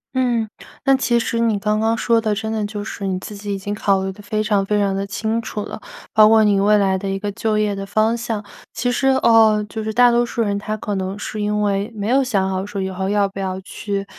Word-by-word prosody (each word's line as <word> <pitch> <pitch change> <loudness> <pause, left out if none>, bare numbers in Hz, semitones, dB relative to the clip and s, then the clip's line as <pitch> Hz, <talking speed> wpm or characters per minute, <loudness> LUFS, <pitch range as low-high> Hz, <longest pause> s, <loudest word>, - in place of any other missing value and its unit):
嗯， 240 -4 +1 0.4
那 270 0 +5
其 245 -2 +1
实 230 0 -2
你 225 -3 +2
刚 210 +1 0
刚 225 +1 +1
说 230 -1 +2
的， 215 -2 0
真 220 +1 -3
的 220 -1 -1
就 205 -1 -5
是 200 -2 -5
你 185 - -1
自 210 - -8
己 205 0 -6
已 - - -3
经 205 +2 -4
考 195 -2 +1
虑 190 - -2
得 205 - -13
非 215 +1 -2
常 210 -2 +1
非 210 +2 0
常 200 -1 +1
地 195 0 -2
清 220 +3 -2
楚 210 -2 -5
了， - - -8 0.3
包 215 -1 +7
括 220 0 +6
你 205 -2 +3
未 210 +1 +4
来 195 -2 +2
的 195 0 -4
一 195 - -1
个 205 +1 -3
就 215 +1 -1
业 210 -1 +1
的 195 0 -5
方 215 +3 +1
向。 230 -3 -3 0.3
其 245 +1 -1
实 270 +2 0
呃， 225 -5 +4
就 220 +1 -5
是 220 - -2
大 245 +2 +5
多 240 0 +3
数 235 -1 -1
人， 200 -1 -1
他 215 +1 -4
可 210 - -4
能 190 +1 -3
是 210 +1 -5
因 210 0 0
为 200 +2 0
没 205 +2 -3
有 270 +2 +4
想 195 -7 0
好 190 0 -2
说， 200 0 -5
以 190 0 -2
后 190 +1 -3
要 205 -1 +2
不 195 0 -9
要 190 -1 -3
去， 200 +1 -4
210 Hz, 290 characters per minute, -20 LUFS, 200-225 Hz, 0.4 s, 包